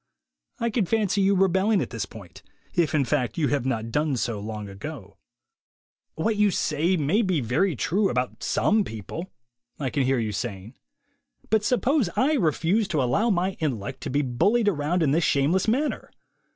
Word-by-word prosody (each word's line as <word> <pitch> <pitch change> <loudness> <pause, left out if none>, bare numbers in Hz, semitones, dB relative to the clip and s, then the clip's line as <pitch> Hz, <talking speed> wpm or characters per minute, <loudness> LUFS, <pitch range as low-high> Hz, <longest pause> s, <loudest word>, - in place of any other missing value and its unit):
I 235 0 -1
can 215 -5 0
fancy 210 -2 +1
your 195 +1 +3
rebelling 190 +2 +3
al 140 - 0
this 115 -4 -5
point, 100 -6 -12 0.3
if, 165 -2 +1
in 140 -3 +2
fact, 130 0 -1
you 150 -4 +1
have 140 -3 0
not 115 -3 -2
done 150 0 0
so 115 -3 -2
lonf 105 0 -5
3 100 - -8
ago. 100 -2 -9 1.0
"What 215 +7 0
you 210 0 +4
say 170 +1 0
may 160 +9 +2
be 185 -7 +1
all 125 - -4
very 155 - +1
true 195 - +1
about 125 +1 -2
some 215 0 +2
people," 115 - -7 0.5
I 135 -4 -2
can 145 - 0
hear, 130 0 +2
^dii 110 -3 -2
saying, 105 0 -5 0.8
"but 220 -1 +3
suppose 250 - +2
I 280 +4 +2
refuse 185 - +1
to 155 -8 0
allow 130 - +1
my 185 -1 +1
intellect 130 -4 -3
to - - -4
be 145 +3 +1
bullied 205 - +1
around 165 -1 +1
in 140 - +2
this 165 +4 +2
shameless 150 +9 +2
manner? 270 +7 0
155 Hz, 185 wpm, -25 LUFS, 125-200 Hz, 1.0 s, you